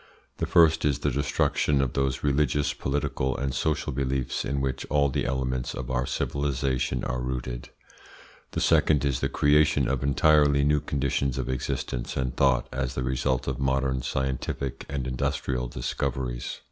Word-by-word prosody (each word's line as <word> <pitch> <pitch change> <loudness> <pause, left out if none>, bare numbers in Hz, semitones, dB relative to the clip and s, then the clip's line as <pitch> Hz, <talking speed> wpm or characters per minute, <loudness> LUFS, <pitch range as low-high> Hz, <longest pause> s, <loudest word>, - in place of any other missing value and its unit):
The - - -2
first 80 -2 +5
is 70 -3 +2
the - - -1
destruction 70 +1 +1
of 65 -2 0
those 70 -2 -1
religious, 75 0 +1
political, 65 -1 -1
and 70 -1 -2
social 75 +2 -1
beliefs 65 -1 -1
in 70 - -1
which 65 -1 -2
all 70 -1 +3
the 65 - -1
elements 65 -1 -2
of 65 0 -5
our 65 0 0
civilisation 65 -3 -1
are 65 -1 -2
rooted. 60 -1 -4 0.8
The - - -1
second 75 -2 +3
is 70 -4 0
the - - 0
creation 75 -2 +3
of 65 -1 0
entirely 70 +1 +4
new 75 +1 +3
conditions 70 -2 -1
of 65 -2 -2
existence - - -3
and 65 -2 -1
thought 65 -2 +3
as 65 0 -3
the 65 - -1
result 65 0 0
of 65 -2 -2
modern 65 -1 +1
scientific 65 0 -3
and 70 -2 -3
industrial 65 0 -1
discoveries. - - -3
65 Hz, 160 wpm, -26 LUFS, 65-70 Hz, 0.8 s, first